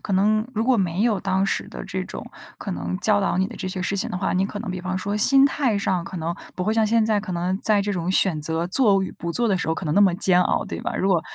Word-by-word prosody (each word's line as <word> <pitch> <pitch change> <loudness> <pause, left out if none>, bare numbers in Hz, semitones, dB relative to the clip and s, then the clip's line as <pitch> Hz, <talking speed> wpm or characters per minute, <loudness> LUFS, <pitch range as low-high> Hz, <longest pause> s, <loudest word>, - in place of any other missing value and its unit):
可 200 - -5
能 215 +4 +2
如 220 - 0
果 255 0 +3
没 185 -1 -1
有 225 -4 +1
当 190 +1 0
时 195 - -1
的 - - -8
这 - - -4
种 - - -8 0.3
可 - - -7
能 90 +1 -4
教 210 -1 +2
导 195 - 0
你 190 +1 0
的 - - -10
这 185 - -5
些 185 0 -4
事 195 +1 -2
情 - - 0
的 180 - -4
话， 190 - -1
你 190 +1 +1
可 205 -1 -7
能 225 - -5
比 185 0 -5
方 185 +1 -3
说 200 +2 -3
心 270 +6 +6
态 275 -5 +1
上 190 -3 -1
可 185 - -8
能 165 +1 -3 0.2
不 180 - -4
会 215 +3 0
像 220 -1 +2
现 225 0 +2
在 215 -1 +1
可 200 -2 -5
能 180 +2 -2
在 210 -1 +2
这 205 0 -2
种 175 0 -2
选 185 -5 +2
择 160 +2 -1
做 200 -3 +4
与 190 - -4
不 170 0 -6
做 235 +5 +1
的 190 - +1
时 - - -3
候 160 - 0
可 180 - -6
能 150 - -1
那 200 - +4
么 190 -4 +4
煎 180 -1 +3
熬， - - 0
对 - - -6
吧。 - - -4
如 190 - 0
果 180 -4 +3
190 Hz, 335 characters per minute, -22 LUFS, 180-210 Hz, 0.3 s, 心